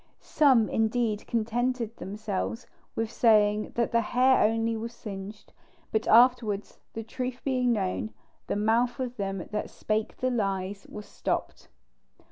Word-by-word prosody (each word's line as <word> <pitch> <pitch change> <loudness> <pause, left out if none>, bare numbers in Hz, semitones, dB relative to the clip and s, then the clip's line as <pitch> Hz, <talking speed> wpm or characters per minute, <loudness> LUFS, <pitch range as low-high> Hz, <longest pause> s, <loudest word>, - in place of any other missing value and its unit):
Some 260 -7 +4
indeed 225 -1 0
contented 235 0 -1
themselves 205 +4 -4 0.3
with 225 0 -2
saying 215 -3 +3
that 235 -1 0
the 235 - +3
hair 255 +3 +3
only 225 +1 +1
was 230 +2 -5
singed; 205 -1 -8 0.4
but 220 0 0
afterwards, 230 -3 +4
the 225 - -5
truth 250 +2 -4
being 255 -2 +1
known, 210 0 -1 0.4
"the - - -1
mouth 230 +4 +1
of 250 -1 -3
them 195 -3 -3
that 210 - -3
spake 215 0 -2
lies 195 -5 -1
was 210 0 -8
stopped." - - -4
225 Hz, 130 wpm, -28 LUFS, 210-240 Hz, 0.4 s, Some